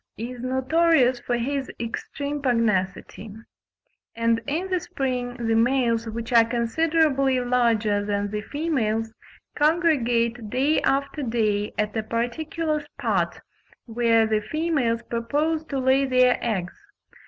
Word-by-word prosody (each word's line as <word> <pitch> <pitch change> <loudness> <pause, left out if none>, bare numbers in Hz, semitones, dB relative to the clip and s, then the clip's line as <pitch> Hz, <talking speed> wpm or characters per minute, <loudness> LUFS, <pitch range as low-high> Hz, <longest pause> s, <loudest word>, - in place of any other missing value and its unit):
37) 235 +4 -5
is 240 - -10
notorious 260 0 +2
for 240 0 -2
his 270 +3 -2
extreme 280 +5 -4
pugnacity; 215 -4 -1 0.8
and 230 0 +1
in 325 +6 -1
the 370 -1 +1
spring, 250 -5 -3
the 230 -2 -1
males, 230 -1 +2
which 230 +2 -5
are 230 -1 +7
considerably 270 +3 +1
larger 230 -4 +1
than 205 0 -2
the 210 0 -3
females, 225 -6 -2 0.4
congregate 245 -8 +1
day 275 +7 +1
after 280 +2 0
day 215 -4 0
at 210 +1 -1
a 220 - 0
particular 300 +8 -2
spot, 225 -12 -2 0.4
where 230 -1 +2
the 215 -1 0
females 260 -3 -1
propose 290 +8 -1
to 280 - -4
lay 265 +1 +3
their 255 -1 +3
eggs. 190 -6 -2
245 Hz, 125 wpm, -24 LUFS, 225-280 Hz, 0.8 s, are